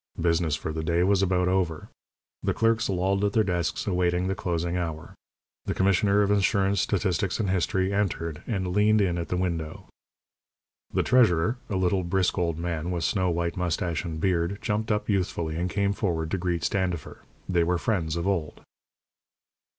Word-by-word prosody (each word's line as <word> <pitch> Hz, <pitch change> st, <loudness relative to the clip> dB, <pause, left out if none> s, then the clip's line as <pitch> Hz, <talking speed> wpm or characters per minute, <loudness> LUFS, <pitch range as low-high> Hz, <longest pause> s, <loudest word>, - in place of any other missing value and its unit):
Business 85 Hz, -2 st, +1 dB
for 80 Hz, +1 st, -4 dB
the 80 Hz, 0 st, -3 dB
day 85 Hz, +2 st, +2 dB
was 95 Hz, 0 st, +3 dB
about 90 Hz, -1 st, +2 dB
over. 90 Hz, -4 st, 0 dB, 0.5 s
The -, -, -1 dB
clerks 115 Hz, 0 st, +2 dB
lolled 95 Hz, +1 st, +1 dB
at 100 Hz, -1 st, +1 dB
their 110 Hz, -, +4 dB
desks, 90 Hz, -3 st, -1 dB
awaiting 90 Hz, -2 st, +1 dB
the 95 Hz, -, 0 dB
closing 85 Hz, -2 st, -2 dB
hour. 80 Hz, -3 st, -4 dB, 0.5 s
The -, -, -2 dB
Commissioner 100 Hz, +2 st, +3 dB
of 100 Hz, -, +1 dB
Insurance, 100 Hz, -1 st, +2 dB
Statistics, 95 Hz, -1 st, 0 dB
and 100 Hz, -4 st, 0 dB
History 95 Hz, +1 st, 0 dB
entered, 85 Hz, -5 st, -1 dB
and 95 Hz, -5 st, -1 dB
leaned 105 Hz, +2 st, +4 dB
in 90 Hz, -4 st, +1 dB
at 85 Hz, -, -4 dB
the 90 Hz, -, -2 dB
window. 85 Hz, -4 st, -3 dB, 1.0 s
The -, -, +1 dB
treasurer, 110 Hz, -3 st, +3 dB
a 100 Hz, -, -2 dB
little, 95 Hz, 0 st, +1 dB
brisk 90 Hz, +1 st, 0 dB
old 85 Hz, -2 st, 0 dB
man, 85 Hz, -1 st, -3 dB
with 85 Hz, -2 st, -2 dB
snow 90 Hz, +2 st, +1 dB
white 85 Hz, 0 st, -1 dB
moustache 85 Hz, -2 st, -1 dB
and 80 Hz, -3 st, -5 dB
beard, 90 Hz, +2 st, 0 dB
jumped 110 Hz, +1 st, -1 dB
up 105 Hz, 0 st, 0 dB
youthfully 90 Hz, -5 st, -1 dB
and 90 Hz, +2 st, -1 dB
came 100 Hz, +2 st, 0 dB
forward 80 Hz, -6 st, -2 dB
to 95 Hz, -, 0 dB
greet 85 Hz, -1 st, -1 dB
Standifer. 90 Hz, -4 st, -2 dB, 0.3 s
They 90 Hz, -2 st, +2 dB
were 90 Hz, +1 st, +1 dB
friends 85 Hz, -4 st, -1 dB
of 85 Hz, +2 st, -2 dB
old. 85 Hz, -6 st, -2 dB
90 Hz, 175 wpm, -26 LUFS, 85-100 Hz, 1.0 s, their